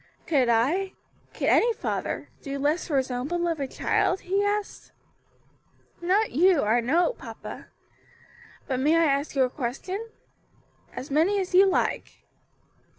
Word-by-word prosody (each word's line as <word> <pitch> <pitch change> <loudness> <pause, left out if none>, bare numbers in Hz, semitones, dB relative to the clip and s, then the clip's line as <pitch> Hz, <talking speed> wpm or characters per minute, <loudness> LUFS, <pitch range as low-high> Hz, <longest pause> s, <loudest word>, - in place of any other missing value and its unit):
"Could 270 -6 +2
I 300 +13 +1 0.4
could - - -3
any 470 +1 +4
father - - -4
do 280 -1 -5
less 295 +5 0
for 295 -5 0
his 265 -1 0
own 250 +2 -3
beloved 335 -5 -1
child?" 365 +1 0
he 390 +3 0
asked. 410 0 -3 1.1
"Not 390 +5 +2
you, 345 +2 +4
I 220 +3 +3
know, 325 - +2
papa. - - -10 1.0
But 260 -1 -2
may 300 +5 +3
I 330 - +4
ask 280 0 0
you 270 - +4
a 255 - +1
question?" 365 - -4 0.8
"As 275 - -8
many 340 +8 +2
as 370 -1 -4
you 385 +2 +7
like." 385 - -1
320 Hz, 145 wpm, -26 LUFS, 270-380 Hz, 1.1 s, you